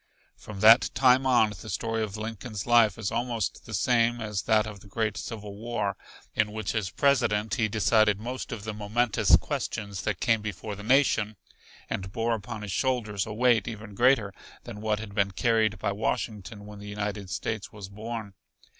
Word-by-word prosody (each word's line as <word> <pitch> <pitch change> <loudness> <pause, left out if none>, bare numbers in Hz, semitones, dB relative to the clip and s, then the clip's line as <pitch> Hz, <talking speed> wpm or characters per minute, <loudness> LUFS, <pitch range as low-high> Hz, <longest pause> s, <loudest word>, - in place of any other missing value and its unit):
From 100 -2 -9
that 115 +3 +8
time 130 0 +5
on 120 -4 +4
the - - -9
story 115 +4 -2
of 110 -1 -3
Lincoln's 110 -1 -5
life 115 -4 +5
is 110 -3 -3
almost 120 -4 -2
the - - -8
same 120 -1 +2
as 105 -3 -2
that 110 -1 +3
of 105 -2 -8
the 100 - -16
great 110 +1 -1
Civil 105 -3 -6
War, 105 -2 -2 0.4
in 105 -1 +1
which 110 -2 -3
as 105 -4 -1
President 110 -7 +2
he 110 - +2
decided 105 -1 +3
most 125 +5 -5
of 110 -4 -5
the 110 0 -4
momentous 110 +3 +3
questions 100 -3 -3
that 105 -4 -2
came 115 -2 +2
before 105 0 -5
the 105 - -9
nation, 115 -3 +2 0.5
and 95 -1 -4
bore 115 +2 0
upon 110 0 -5
his 105 - -5
shoulders 110 -5 -1
a 105 - -5
weight 120 -3 +3
even 110 -2 -7
greater 115 -3 +3 0.3
than 110 -3 -8
what 110 -1 0
had 105 -1 -7
been 100 -1 +2
carried 110 +1 +2
by - - -1
Washington 105 0 -3
when 105 -1 -10
the 105 0 -9
United 105 -1 -4
States 110 +3 -3
was 100 -3 -9
born. 110 +1 -6
110 Hz, 185 wpm, -27 LUFS, 105-115 Hz, 0.5 s, that